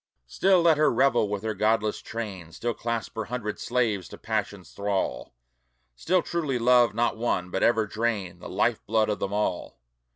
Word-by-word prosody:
Still 185 - +3
let 165 -3 +5
her 150 0 +4
revel 120 -3 +3
with 105 0 -3
her 110 -1 -1
godless 110 0 +1
train, 100 -8 -6
Still 120 0 -2
clasp 115 0 -3
her 110 - -2
hundred 110 -2 -4
slaves 115 -7 0
to - - -10
passion's 105 -4 -3
thrall, 100 -10 -2 0.6
Still 180 - +1
truly 155 -7 -1
love 120 -2 +4
not 120 -1 +1
one, 90 -6 -1
but 95 - -2
ever 115 -2 +3
drain 110 -4 -2
The - - -9
life - - 0
blood 110 0 +2
of 105 - -1
them 95 - -2
all. 105 -3 -2
110 Hz, 175 wpm, -26 LUFS, 105-120 Hz, 0.6 s, let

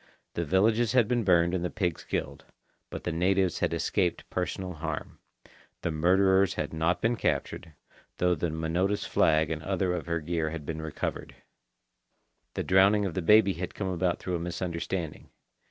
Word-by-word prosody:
The 85 - -2
villages 110 - +2
had 125 -4 +4
been 120 -1 +1
burned 85 -2 +3
and 90 -2 -1
the 90 - -1
pigs 90 -4 -2
killed. - - -4 0.5
But - - -7
the 85 - -2
natives 90 +2 +1
had - - 0
escaped 90 -2 -1
personal 90 0 -3
harm. 80 -2 -5 0.6
The 85 - 0
murderers 95 +4 +3
had - - -3
not 80 +2 0
been 115 +2 +2
captured, 80 -7 -2 0.4
though 90 0 +2
the 85 +1 -1
Minota's 85 +6 -1
flag 80 0 +2
and 80 -1 -3
other 95 +1 -1
of 90 - -4
her 85 -1 0
gear 80 0 -2
had 80 -2 -6
been 80 +1 -4
recovered. 80 -1 -5 1.2
The - - -1
drowning 100 +2 +4
of 95 - -3
the 95 - -2
baby 100 +3 +5
had 90 0 -6
come 95 -2 -3
about 90 -1 0
through 90 - -3
a - - -6
misunderstanding. 85 -1 -4
90 Hz, 170 wpm, -28 LUFS, 80-95 Hz, 1.2 s, baby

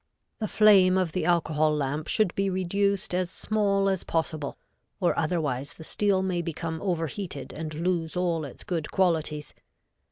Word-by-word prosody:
The 215 - -1
flame 195 -4 +6
of 185 -3 +1
the 170 -1 -1
alcohol 155 -3 +2
lamp 145 +1 -2
should 215 -6 +2
be 195 0 0
reduced 190 +1 0
as 180 -1 0
small 200 -1 +1
as 190 -2 0
possible, 160 -3 -2 0.4
or 180 -3 +2
otherwise 150 -5 -1
the - - -10
steel 195 +2 +1
may 180 -2 0
become 165 -1 -4
overheated 170 -4 -3
and 155 0 -5
lose 170 0 -1
all 170 -3 0
its 140 - -8
good 165 -4 -3
qualities. 160 -5 0
175 Hz, 155 wpm, -27 LUFS, 155-190 Hz, 0.4 s, flame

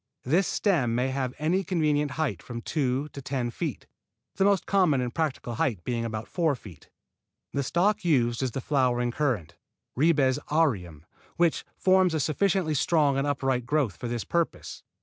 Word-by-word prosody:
This 170 +9 +2
stem 140 - +1
may 125 +2 +1
have 130 -1 -2
any 175 +6 +1
convenient 150 -5 +1
height 135 - -1
from 120 -2 -7
two 140 -1 -1
to 140 - -9
ten 125 -3 -2
feet, 150 - -4 0.5
the 190 - +3
most 200 -1 +3
common 180 -9 +3
and 125 -1 -2
practical 150 -7 -2
height 110 -6 -1
being 115 +2 -2
about 110 -1 -4
four 165 -5 +1
feet. 95 - -14 0.6
The 140 - 0
stock 180 +10 +1
used 120 -8 +2
is 130 - 0
the 130 +3 -5
flowering 125 -3 +1
currant, 120 - -1 0.4
Ribes 140 -3 +3
aureum, 95 - 0 0.3
which 170 -2 +2
forms 185 -2 +3
a - - +1
sufficiently 170 +3 +1
strong 150 -1 +2
and 135 +1 0
upright 135 -4 -1
growth 140 -8 +1
for 120 - -6
this 120 -2 -3
purpose. 170 -1 -2
140 Hz, 170 wpm, -27 LUFS, 120-160 Hz, 0.6 s, the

